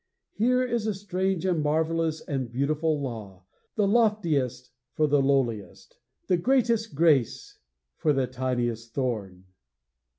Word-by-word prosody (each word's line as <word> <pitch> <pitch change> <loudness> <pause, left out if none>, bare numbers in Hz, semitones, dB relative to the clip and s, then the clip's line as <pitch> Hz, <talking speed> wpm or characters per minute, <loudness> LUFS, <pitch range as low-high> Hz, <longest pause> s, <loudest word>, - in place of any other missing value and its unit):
Here 250 +3 +2
is 235 -3 -1
a 215 - -1
strange 190 -1 -2
and 175 -4 +1
marvelous 160 +1 0
and 130 -5 -4
beautiful 150 +4 0
law! 105 -9 -7 0.3
The 210 -2 +2
loftiest 170 - +1 0.2
for 155 - +3
the 145 -1 +3
lowliest! 130 -6 -1 0.3
The 180 - +2
greatest 230 - +1
grace 145 -6 +1 0.4
for 155 - +2
the 135 -2 +1
tiniest 120 -2 -3
thorn! 105 -9 -3
150 Hz, 125 wpm, -26 LUFS, 125-190 Hz, 0.4 s, for